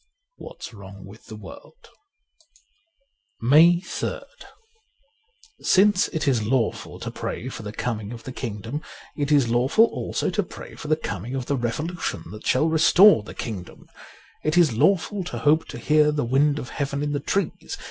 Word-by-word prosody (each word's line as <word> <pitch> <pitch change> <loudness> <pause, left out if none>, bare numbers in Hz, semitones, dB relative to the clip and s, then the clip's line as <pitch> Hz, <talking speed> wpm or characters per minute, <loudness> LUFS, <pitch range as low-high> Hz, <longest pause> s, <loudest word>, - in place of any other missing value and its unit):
' - - -53
What's - - -10
Wrong 100 -2 -11
with 100 +3 -15
the 110 - -9
World: 105 - -13 1.5
134 115 - -4
MAY 170 +4 +7
3rd - - -4 1.4
SINCE 195 0 +4
it 155 -2 -3
is 125 -5 +2
lawful 115 +2 -1
to - - -5
pray 130 - -5
for 125 - -8
the 105 -1 -6
coming 110 -2 -4
of 115 -1 -9
the 130 - -7
Kingdom, 115 +3 -5 0.3
it 145 -1 -2
is 140 -5 +4
lawful 125 - +4
also - - -3
to - - +1
pray - - -10
for 150 - -9
the 155 - +3
coming 130 -4 -5
of 130 -2 -3
the 140 - 0
revolution 135 - -3
that 105 +1 -9
shall 140 +5 +3
restore 170 - +6
the 105 - -11
Kingdom. 95 -7 -7 0.6
It 155 +3 0
is 165 -8 +5
lawful 195 - +2
to - - -5
hope 155 +2 +2
to - - -8
hear 150 0 +3
the 150 -3 -1
wind 140 +4 +2
of 125 - -6
Heaven 140 0 -3
in 145 - -1
the 145 - -1
trees. 195 +5 -3
140 Hz, 175 wpm, -24 LUFS, 115-160 Hz, 1.5 s, MAY